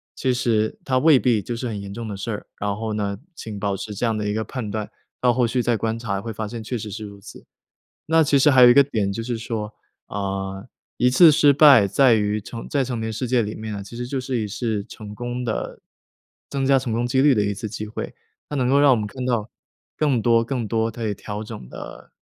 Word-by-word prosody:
其 130 -2 0
实 110 -3 0
它 130 -1 +1
未 150 -3 +6
必 120 -4 +2
就 120 +5 -5
是 125 +1 -4
很 105 -3 -4
严 100 0 -7
重 115 0 -6
的 105 - -5
事 105 +4 -4
儿， 105 - -6
然 100 0 -2
后 110 0 -4
呢， 100 -2 -2 0.2
请 105 -7 -7
保 100 -1 -1
持 105 +2 -6
这 105 - -5
样 110 -2 0
的 105 - -2
一 105 - -1
个 110 0 -1
判 115 -5 -5
断， 105 -1 -4 0.3
到 125 -1 +4
后 125 -1 +2
续 125 +2 0
再 120 -1 +1
观 115 +1 -2
察 100 -4 -2
会 115 - -5
发 110 +1 -4
现 115 +1 -7
确 115 +3 -4
实 110 -1 -6
是 110 +1 -6
如 100 -1 -11
此。 - - -13 0.6
那 160 +1 +4
其 140 -1 +3
实 150 +2 +5
还 130 -2 +6
有 120 - +10
一 - - +6
个 140 - +8
点 105 -7 -1
就 115 - -4
是 120 0 -3
说： 110 -2 -4 0.3
“啊， 95 -1 -4 0.3
一 125 - +4
次 160 +5 +8
失 145 -1 +5
败 140 -8 +7
在 125 +5 +4
于 105 0 0
成 115 +2 -8
在 140 -2 +1
成 120 -2 -4
年 110 0 -3
世 125 +4 -3
界 125 -1 +3
里 105 +1 -4
面 110 0 -6
呢， 100 - -5
其 110 +4 -11
实 120 0 -4
就 135 +1 -3
是 130 -1 -2
一 105 - -2
次 110 -1 -2
成 105 -1 -10
功 120 +3 -4
的 110 - -4 0.7
增 135 -1 -1
加 135 -1 +5
成 125 -3 -3
功 120 +2 0
几 130 +2 +1
率 145 -3 +5
的 105 - +2
一 100 - 0
次 110 +2 -5
机 105 0 -6
会。” 105 - -6 0.4
它 145 - -3
能 125 -2 +1
够 140 +2 +4
让 145 - +6
我 - - +4
们 105 -1 -2
看 130 +3 -6
到， 120 -3 -1 0.5
更 135 -7 +1
多 115 0 +4
更 120 -1 -3
多 115 +1 0
可 115 0 -5
以 105 - 0
调 105 +2 -6
整 105 - -9
的 - - -10
115 Hz, 280 characters per minute, -22 LUFS, 105-125 Hz, 0.7 s, 有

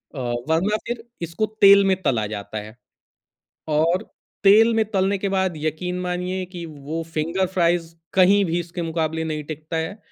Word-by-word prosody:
अ, 135 - -5 0.3
वरना 185 +7 +2
फिर 235 -1 -4 0.2
इसको 170 +6 -1 0.2
तेल 200 0 +8
में 190 -1 +3
तला 115 -11 +1
जाता 105 0 -6
है। 105 +1 -8 0.9
और 165 +4 +2 0.4
तेल 220 +4 +6
में 225 - +3
तलने 195 0 +1
के 195 +1 -2
बाद 190 -2 0
यकीन 170 +4 -3
मानिए 180 +1 -2
कि 175 -1 -6
वो 155 +1 -6
फ़िंगर 170 +5 0
फ्राइज़ 170 -1 +1 0.2
कहीं 195 +2 +5
भी 170 +1 0
इसके 170 0 -5
मुक़ाबले 160 -1 -1
नहीं 155 -1 -3
टिकता 155 +2 -5
है, 160 +6 -3
170 Hz, 165 wpm, -22 LUFS, 160-190 Hz, 0.9 s, तेल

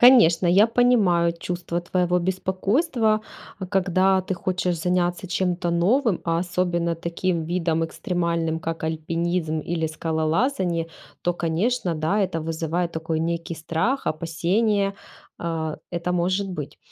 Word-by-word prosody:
Конечно, 210 -9 +7
я 195 +5 +6
понимаю 210 -9 +3
чувство 175 0 -3
твоего 180 0 +1
беспокойства, 210 - +1 0.4
э, 190 - -3
когда 190 0 +2
ты 185 0 -3
хочешь 180 0 -1
заняться 180 +1 0
чем-то 180 -1 0
новым, 200 +5 +2
а 165 -1 +1
особенно 175 -1 0
таким 170 0 -2
видом 165 -1 0
экстремальным, 170 -1 -1
как 165 0 -4
альпинизм 160 0 -1
или 165 +1 -2
скалолазание, 165 - 0 0.4
то, 175 - +1
конечно, 175 +4 0
да, 160 +7 0
это 185 -4 0
вызывает 165 +2 -2
такой 160 0 -2
некий 170 +1 -2
страх, 165 - -1
опасение, 195 +6 +1 0.4
а, 160 -2 -3
это 175 +1 -2
может 185 +3 0
быть. 150 -4 -6
175 Hz, 125 wpm, -24 LUFS, 165-190 Hz, 0.4 s, Конечно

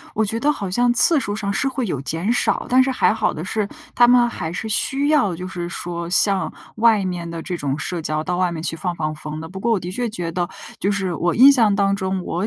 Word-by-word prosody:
我 220 0 +2
觉 225 +3 -2
得 290 - +2
好 200 -9 -5
像 240 +4 +2
次 295 +4 +5
数 205 -3 -3
上 200 -2 -2
是 270 - 0
会 260 -3 -3
有 145 -8 -3
减 165 - -2
少， - - 0
但 255 +1 +5
是 265 - 0
还 255 - +2
好 220 - 0
的 155 - -6
是， 205 +1 -2 0.3
他 240 0 +5
们 245 -1 +5
还 160 -8 -5
是 220 +5 -4
需 275 +6 +1
要 265 - +2
就 180 +2 -6
是 175 -2 -5
说 170 0 -5
像 195 +1 +2 0.2
外 220 -3 +3
面 175 -2 -4
的 165 -1 -6
这 180 -2 -4
种 140 -2 -3
社 175 +4 -4
交， 155 0 -2
到 180 -1 -2
外 180 -1 +1
面 160 -1 -5
去 165 - -3
放 175 +2 -3
放 155 -1 -3
风 155 0 -7
的。 160 - -7
不 190 +2 -8
过 235 +2 +1
我 210 - +2
的 175 - -6
确 240 +2 -2
觉 175 -6 -4
得， 175 0 -2 0.3
就 200 - 0
是 195 -3 -1
我 175 +1 0
印 265 +5 +8
象 225 -7 +3
当 200 -1 +2
中 190 -1 -2
我 180 +5 -2
190 Hz, 285 characters per minute, -21 LUFS, 170-230 Hz, 0.3 s, 印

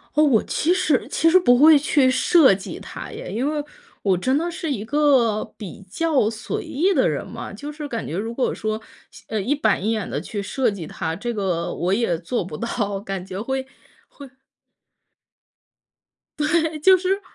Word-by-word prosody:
哦， 305 - +5
我 250 -8 +4
其 340 +3 +1
实 310 -7 +1
其 330 - +3
实 370 +3 +6
不 245 -9 +4
会 305 +1 +7
去 280 -2 +3
设 295 - +5
计 190 0 -6
它 - - -8
耶。 - - -7
因 265 +5 -1
为 300 -1 -2 0.4
我 190 -3 +2
真 260 +10 +1
的 340 +2 -1
是 330 -1 -4
一 215 -7 -2
个 255 -5 +2
比 205 -1 -9
较 300 - +1
随 220 0 -5
意 360 +8 +1
的 270 - +3
人 150 -3 -2
嘛。 - - -8
就 285 +9 -7
是 300 -1 -7
感 230 -4 -4
觉 165 - -4
如 225 +4 -3
果 255 - 0
说， 215 0 -3 0.5
呃， 220 -2 -2
一 260 +10 0
板 220 -8 +1
一 220 - +1
眼 215 -4 -2
地 - - -2
去 205 -3 -5
设 245 +4 0
计 190 -6 -6
它， 160 +1 -4
这 240 +6 -4
个 180 -5 -2
我 180 +2 -1
也 200 -6 +1
做 180 +8 -2
不 170 -4 -7
到。 205 -4 -2
感 195 -2 -5
觉 190 0 -6
会 265 +3 -2 0.4
会 280 -2 -12 2.1
对， 315 0 +1
就 375 +5 +6
是 385 +2 -1
245 Hz, 205 characters per minute, -22 LUFS, 205-300 Hz, 2.1 s, 会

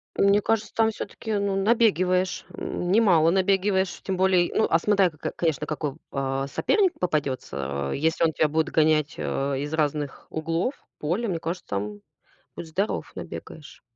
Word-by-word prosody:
Мне 200 +1 +4
кажется, 220 0 0
там 225 0 +3
всё-таки, 220 +1 -6
ну, 200 -1 0
набегиваешь. 195 -4 +2
М, 175 +1 -3
немало 180 -7 +5
набегиваешь. 190 0 +1
Тем 190 - -2
более, 185 -1 +3
ну, 220 - +3
а 165 - +5
смотря, 195 +1 +3
ко 155 - -20
ко - - -4
конечно, 155 -3 0
какой, 150 -2 -3 0.2
а, 135 0 -1
соперник 375 - +1
попадётся. 70 - -2
Если 160 +3 +1
он 165 - +4
тебя 155 - +2
будет 160 +1 0
гонять, 155 -2 +2
а, 140 0 -1
из 145 +3 -4
разных 150 -2 -2
углов 165 - -1 0.2
поля, 180 +10 -1
мне 175 -5 -1
кажется, 170 +3 -4
там 105 +1 -3 0.6
будь - - -6
здоров 190 +6 -2
набегаешься. 150 - -9
170 Hz, 160 wpm, -25 LUFS, 150-195 Hz, 0.6 s, немало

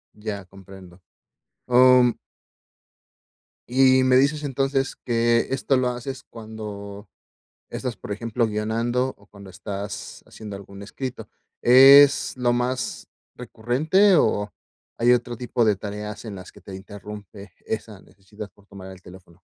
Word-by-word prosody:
Ya, 105 -2 -6
comprendo, 95 -1 -15 0.7
oh, 125 +1 +6
mm. 120 -2 +1 1.5
Y 130 +1 +4
me 130 0 +4
dices 145 +3 +1
entonces 135 0 -1
que 115 -1 +1
esto 135 0 +1
lo 125 -1 +1
haces 130 +2 -6
cuando 105 -2 -9 0.6
estás, 125 -3 -5
por 105 - -7
ejemplo, 115 +2 -1
guionando 115 +4 -1
o 100 - -22
cuando 100 -2 -14
estás 100 +1 -7
haciendo 105 -2 -10
algún 100 0 -11
escrito, 130 +4 -7 0.3
¿es 135 +3 +7
lo 125 -1 +1
más 125 +1 -3 0.3
recurrente 145 - +1
o 105 -8 +1 0.5
hay 120 +1 +4
otro 120 0 -1
tipo 120 0 -1
de 105 -2 +3
tareas 105 +2 -7
en 100 - -7
las 90 -1 -11
que - - -17
te 95 -1 -10
interrumpe 100 -1 -11
esa 110 -3 -5
necesidad 105 +2 -12
por 100 - -24
tomar 95 -2 -11
el 95 -1 -15
teléfono? 90 0 -16
110 Hz, 135 wpm, -23 LUFS, 100-125 Hz, 1.5 s, es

